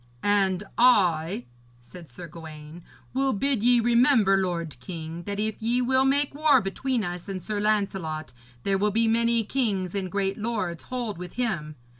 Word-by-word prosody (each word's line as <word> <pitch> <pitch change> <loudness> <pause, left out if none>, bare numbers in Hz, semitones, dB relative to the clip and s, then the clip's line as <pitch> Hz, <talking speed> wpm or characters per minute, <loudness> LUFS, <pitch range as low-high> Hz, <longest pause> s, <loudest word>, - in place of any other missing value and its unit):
'And 195 -2 +2 0.2
I,' 175 - +3 0.3
said 165 +7 -13
Sir 170 +8 -9
Gawaine, 160 0 -11 0.3
'will 270 +1 +1
bid 260 +2 +2
ye 245 +1 +5
remember, 235 -3 +4
lord 170 -7 -2
king, 165 +3 -7
that 200 0 -4
if 215 0 -2
ye 235 +3 +1
will 260 +1 +3
make 280 +1 +1
war 300 +1 +4
between 235 +5 -2
us 175 0 -5
and 190 -1 -3
Sir 205 +3 -4
Lancelot, 195 -7 -1 0.3
there 195 -1 +1
will 210 +1 +2
be 225 +2 +2
many 230 0 +2
kings 205 -7 -1
and 190 -3 -3
great 195 0 -1
lords 210 -7 -3
hold 240 -7 -4
with 180 -1 -8
him. 170 -12 -2
200 Hz, 165 wpm, -26 LUFS, 175-235 Hz, 0.3 s, ye